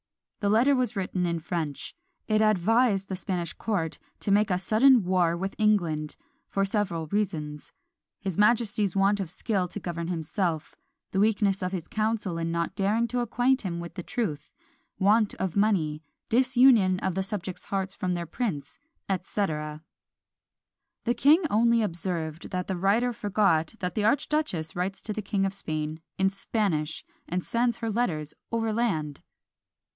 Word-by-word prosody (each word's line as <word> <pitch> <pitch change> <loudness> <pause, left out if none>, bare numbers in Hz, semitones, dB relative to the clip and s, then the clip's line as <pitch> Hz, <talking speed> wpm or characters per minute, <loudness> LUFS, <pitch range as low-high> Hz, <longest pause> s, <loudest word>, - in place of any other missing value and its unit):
The 205 -3 0
letter 240 +7 +4
was 250 -2 0
written 185 -2 -1
in 170 0 0
French; 160 -3 -4 0.3
it 215 0 +3
advised 215 0 +3
the 190 - -3
Spanish 180 -2 -3
court 180 -8 -2 0.2
to 200 - -1
make 205 +1 +4
a 180 - +2
sudden 225 +6 +5
war 175 -2 +2
with 195 +2 -3
England, 170 -8 +1 0.3
for 195 0 0
several 195 -6 -1
reasons; 155 -6 -3 0.5
his 190 -3 -3
majesty's 210 -3 +3
want 200 +1 +3
of 190 -4 -3
skill 190 +1 -1
to 180 - -7
govern 170 -2 -4
of - - -2
himself; 165 -1 -2 0.4
the 190 - 0
weakness 205 -2 +2
of 185 0 -1
his 180 -4 -4
council 215 -5 -1
in 165 0 -1
not 170 0 -2
daring 215 +4 +1
to 245 - -1
acquaint 245 +2 +2
him 175 -4 -3
with 170 0 -7
the 180 - -5
truth; 170 - -3 0.5
want 210 +2 +3
of 190 -3 -3
money; 180 -8 +1 0.3
disunion 245 -6 +5
of 190 - 0
the 190 - -1
subjects' 190 -2 -4
hearts 195 -1 -2
from 185 -1 -2
their 175 -1 -3
prince, 165 - -4 0.3
&c. 195 +2 -1
The 150 -2 -4 1.3
king 295 +9 +5
only 230 +1 +4
observed, 170 -4 -3
that 180 -1 -2
the 190 - -2
writer 210 +7 +2
forgot 205 -6 +1
that 180 -1 -2
the 210 -2 0
archduchess 260 - 0
writes 185 +2 -3
to 215 - -3
the 215 - -3
King 195 -1 0
of 195 - -1
Spain 155 -4 -3 0.2
in 190 0 +2
Spanish, 190 -6 -1 0.2
and 180 +1 -2
sends 235 0 +1
her 225 -1 -2
letters 160 -10 -1 0.2
overland. 220 -10 -1
195 Hz, 160 wpm, -27 LUFS, 170-220 Hz, 1.3 s, sudden